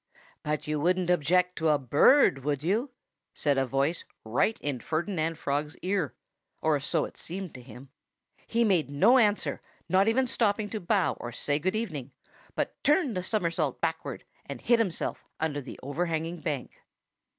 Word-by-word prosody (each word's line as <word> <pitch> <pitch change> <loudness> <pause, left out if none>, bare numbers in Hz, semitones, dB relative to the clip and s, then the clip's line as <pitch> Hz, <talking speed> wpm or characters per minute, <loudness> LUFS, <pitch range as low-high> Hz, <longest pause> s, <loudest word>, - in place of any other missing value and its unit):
"But 150 0 -2
you 150 0 -1
wouldn't 180 +3 +2
object 180 +2 +2
to 160 -1 +1
a 150 - +4
bird, 140 - +4
would 145 0 -1
you?" 215 - +1 0.5
said 145 -2 +1
a 135 - 0
voice 140 +6 0 0.2
right 125 - +1
in 145 -4 -3
Ferdinand 165 - -2
Frog's 150 +1 -2
ear 185 -5 -1 0.4
or 155 -2 +2
so 150 +3 0
it - - -12
seemed 185 0 -5
to 125 - -10
him. 125 +2 -12 0.6
He 235 +1 +2
made 185 -9 +2
no 235 - +5
answer 210 -3 +1 0.3
not 190 +2 +3
even 255 +4 +3
stopping 215 -3 0
to 215 - -3
bow, 195 +1 +1
or 120 - -5
say 145 +5 -1
good 185 +6 -1
evening 150 - -4 0.4
but - - -3
turned 295 - +3
a 180 - -1
somersault 180 -3 -1
backward - - -3 0.2
and - - -6
hid 240 -1 +3
himself 190 -7 -1 0.2
under 150 -2 -1
the 130 - -10
overhanging 165 +3 -2
bank. 145 -4 -3
165 Hz, 165 wpm, -28 LUFS, 145-200 Hz, 0.6 s, no